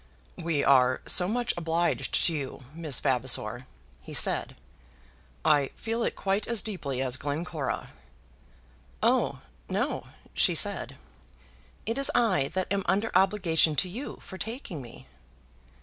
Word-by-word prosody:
"We 160 Hz, -3 st, +1 dB
are 130 Hz, -2 st, +5 dB
so 180 Hz, -, +3 dB
much 240 Hz, +3 st, +1 dB
obliged 170 Hz, 0 st, 0 dB
to 170 Hz, -, +2 dB
you, 140 Hz, -2 st, -5 dB
Miss 160 Hz, -5 st, 0 dB
Vavasor," 125 Hz, -1 st, -1 dB, 0.3 s
he -, -, -8 dB
said. -, -, +2 dB, 0.9 s
"I 145 Hz, -2 st, +4 dB
feel 230 Hz, +1 st, -3 dB
it -, -, 0 dB
quite 195 Hz, +1 st, 0 dB
as 235 Hz, -3 st, +1 dB
deeply 140 Hz, -, -3 dB
as 130 Hz, -1 st, 0 dB
Glencora." 150 Hz, +1 st, -3 dB, 1.1 s
"Oh, -, -, +2 dB, 0.3 s
no," -, -, -1 dB, 0.3 s
she -, -, +4 dB
said; -, -, +1 dB, 0.9 s
"it 230 Hz, +5 st, -1 dB
is 275 Hz, -, +4 dB
I 190 Hz, -, +3 dB
that 185 Hz, +1 st, 0 dB
am 200 Hz, -, +1 dB
under 200 Hz, +4 st, +1 dB
obligation 180 Hz, -5 st, +4 dB
to 185 Hz, -, +1 dB
you 235 Hz, +10 st, -6 dB
for 190 Hz, -, -9 dB
taking 225 Hz, -, -5 dB
me." 120 Hz, -2 st, -11 dB
170 Hz, 135 wpm, -28 LUFS, 140-205 Hz, 1.1 s, are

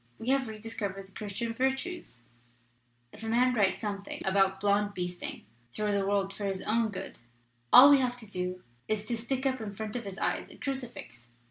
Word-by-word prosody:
We 230 Hz, -, -4 dB
have 270 Hz, -2 st, +3 dB
rediscovered 210 Hz, -3 st, -4 dB
the 195 Hz, -, -20 dB
Christian 215 Hz, +3 st, -4 dB
Virtues. 265 Hz, -, -2 dB, 0.9 s
If -, -, -12 dB
a 225 Hz, -, -5 dB
man 250 Hz, +2 st, +4 dB
writes 205 Hz, -4 st, +2 dB
something 200 Hz, -1 st, -4 dB
about 195 Hz, 0 st, +3 dB
blond 205 Hz, 0 st, +2 dB
beasting 180 Hz, -1 st, -4 dB, 0.3 s
through 210 Hz, +8 st, -1 dB
the 200 Hz, -1 st, +1 dB
world 195 Hz, -1 st, +1 dB
for 205 Hz, -, -5 dB
his 190 Hz, -1 st, -2 dB
own 225 Hz, +1 st, +2 dB
good, 200 Hz, -, -7 dB, 0.5 s
all 275 Hz, +3 st, +11 dB
we 285 Hz, -, +7 dB
have 250 Hz, -1 st, 0 dB
to 225 Hz, -3 st, -9 dB
do 180 Hz, -1 st, -3 dB, 0.2 s
is 215 Hz, -1 st, -1 dB
to 235 Hz, -, -1 dB
stick 255 Hz, +4 st, -2 dB
up 260 Hz, -2 st, +1 dB
in 205 Hz, -2 st, -5 dB
front 215 Hz, +1 st, -5 dB
of 240 Hz, -, -3 dB
his 195 Hz, -1 st, -6 dB
eyes -, -, -1 dB
a -, -, -13 dB
crucifix. 240 Hz, -, -5 dB
210 Hz, 195 wpm, -30 LUFS, 195-245 Hz, 0.9 s, all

